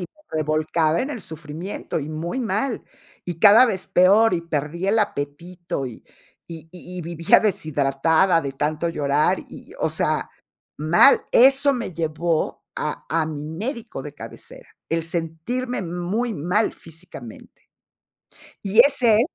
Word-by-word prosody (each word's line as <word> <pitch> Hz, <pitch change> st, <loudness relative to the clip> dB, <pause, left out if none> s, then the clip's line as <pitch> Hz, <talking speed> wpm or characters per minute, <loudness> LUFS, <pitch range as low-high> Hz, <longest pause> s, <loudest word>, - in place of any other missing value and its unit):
me 180 Hz, -, -5 dB, 0.3 s
revolcaba 155 Hz, +1 st, +1 dB
en 275 Hz, -, -3 dB
el 245 Hz, -, -5 dB
sufrimiento, 160 Hz, +3 st, -5 dB
y 145 Hz, -, -6 dB
muy 165 Hz, +10 st, -4 dB
mal, 225 Hz, +2 st, -2 dB, 0.4 s
y 175 Hz, -2 st, -5 dB
cada 215 Hz, +7 st, +8 dB
vez 190 Hz, -6 st, -2 dB
peor, 195 Hz, +3 st, +4 dB
y 170 Hz, -, -1 dB
perdí 165 Hz, +3 st, -3 dB
el 220 Hz, +3 st, +2 dB
apetito 170 Hz, -3 st, -3 dB
y 120 Hz, -, -10 dB, 0.5 s
y 165 Hz, -1 st, -9 dB
y 180 Hz, 0 st, -11 dB
y -, -, -3 dB
vivía 165 Hz, 0 st, +3 dB
deshidratada 160 Hz, -2 st, +2 dB
de 140 Hz, -3 st, -5 dB
tanto 150 Hz, +4 st, -2 dB
llorar, 150 Hz, -2 st, +1 dB
y, -, -, -13 dB
o -, -, 0 dB
sea, -, -, -1 dB, 0.5 s
mal. 160 Hz, -, +5 dB
Eso 275 Hz, +3 st, +6 dB
me 235 Hz, -6 st, -4 dB
llevó 160 Hz, 0 st, -2 dB
a -, -, -4 dB
a 160 Hz, -1 st, +1 dB
mi 150 Hz, -2 st, -6 dB
médico 230 Hz, -, -5 dB
de -, -, -9 dB
cabecera. -, -, -11 dB, 0.2 s
El 165 Hz, 0 st, 0 dB
sentirme 170 Hz, +9 st, -3 dB
muy 180 Hz, +7 st, -2 dB
mal 180 Hz, +6 st, 0 dB
físicamente. 160 Hz, -8 st, -13 dB, 0.9 s
Y 200 Hz, +3 st, +4 dB
es 280 Hz, +2 st, +5 dB
él 225 Hz, -2 st, +5 dB
170 Hz, 145 wpm, -22 LUFS, 155-215 Hz, 0.9 s, cada